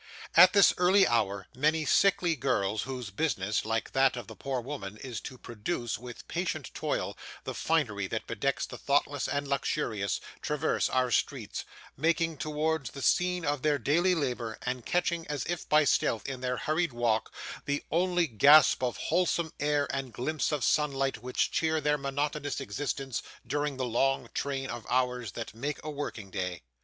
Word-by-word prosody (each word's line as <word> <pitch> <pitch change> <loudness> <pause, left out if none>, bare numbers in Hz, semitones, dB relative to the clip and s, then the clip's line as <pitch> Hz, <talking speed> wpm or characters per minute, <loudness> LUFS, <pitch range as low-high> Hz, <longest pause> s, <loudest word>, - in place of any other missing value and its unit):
At - - +9
this 200 -2 +7
early 190 +2 +6
hour 100 -5 +1
many 155 +4 +2
sickly 180 -1 +3
girls, 110 -7 0
whose 125 -5 -5
business, 105 -6 0
like 115 +1 -1
that 135 -1 +3
of 120 - -5
the 110 - -10
poor 135 +1 -3
worm, 115 -6 -6
is 120 -5 -4
to 130 - -8
produce, 120 0 -4
with 125 -1 -10
patient - - -3
toil, - - -2 0.3
the - - -4
finery 110 -12 0
that 110 +3 -3
bedecks 140 -1 -1
the - - -9
thoughtless 145 0 +1
and 140 0 -2
luxurious, 115 -8 -1 0.2
traverse 150 +1 0
our 130 -1 +1
streets, 100 - -1 0.3
making 165 +2 +1
towards 155 -2 -1
the 140 - -8
scene 180 -1 +2
of 145 -2 0
their 150 0 +2
daily 170 +8 +2
labour, 125 -7 -2
and 125 -1 -3
catching, 170 -1 0
as 145 -4 -3
if 175 0 -4
by 155 0 +6
stealth, 115 -5 +1
in 130 -2 -5
their 125 -1 -1
hurried 155 -2 0
walk, 120 -2 0 0.3
the 145 0 -1
only 175 +1 +2
gasp 145 +4 +6
of 125 -2 -1
wholesome 170 -3 0
air 145 -1 +1
and 135 -3 -4
glimpse 155 +6 -1
of 150 -4 -1
sunlight 135 -3 +1
which 125 +2 -1
cheer 160 -1 +1
their 150 -1 +1
monotonous 145 0 -2
existence 135 -2 -3 0.2
during 145 -1 -1
the 130 - -1
long 135 +3 0
train 135 -1 -2
of 120 -2 -5
hours 125 -3 0
that 115 -3 -6
make 140 +6 -3
a 155 - -4
working 120 -9 -5
day. 90 -6 -3
140 Hz, 170 wpm, -29 LUFS, 120-155 Hz, 0.3 s, At